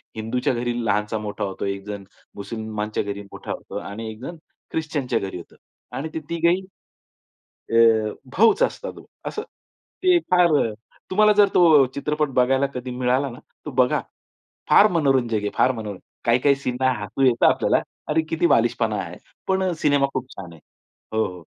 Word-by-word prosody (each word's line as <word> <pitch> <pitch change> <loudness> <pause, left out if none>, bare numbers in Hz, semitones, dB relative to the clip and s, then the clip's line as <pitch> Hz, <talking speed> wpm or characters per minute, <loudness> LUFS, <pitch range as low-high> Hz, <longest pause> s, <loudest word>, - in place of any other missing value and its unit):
हिंदूच्या 115 +4 -1
घरी 120 0 -1
लहानचा 105 +1 0
मोठा 105 0 -5
होतो, 95 -2 -4
एक 100 0 -3
जण 100 -1 -6 0.3
मुस्लिमांच्या 110 0 -4
घरी 100 0 -5
मोठा - - -7
होतो - - -6
आणि 110 +3 -6
एक 110 - -12
जण 170 +6 -6 0.4
ख्रिश्चनच्या 145 -7 -1
घरी 95 -2 -5
होतो 85 - -12 0.4
आणि 155 +4 -4
ते 160 - -2
तिघेही 170 +2 +2 1.1
अ, - - 0 0.6
भाऊच 225 - +5
असतात - - -1
हो - - -13 0.2
असं. 430 - -3 0.6
ते 365 -1 +5
फार 180 -1 +5 0.6
तुम्हाला 210 +2 +5
जर 205 -1 +6
तो 160 -6 +7
चित्रपट 150 +1 -1
बघायला 135 +2 +3
कधी 125 0 -5
मिळाला 130 +2 +1
ना 120 - -10 0.3
तर - - -3
बघा. 125 -1 +2 0.7
फार 210 - +7
मनोरंजक 135 -8 +2
आहे, 105 0 -2
फार 130 - +3
मनोरंजक. 105 -5 -7 0.2
काही-काही 125 +4 +4
सीनला 130 -1 0
हसू 105 +7 -3
येतं 125 -2 +4
आपल्याला. - - +3 0.3
अरे, 160 +1 +2
किती 165 +2 +1
बालिशपणा 115 -5 +2
आहे. 90 0 -8 0.3
पण 190 -1 +1
सिनेमा 145 -2 +3
खूप 130 0 -3
छान 90 -4 -8
आहे. 80 - -15 0.6
हो, 110 - +3
हो. 90 -2 -9
125 Hz, 160 wpm, -23 LUFS, 110-155 Hz, 1.1 s, तो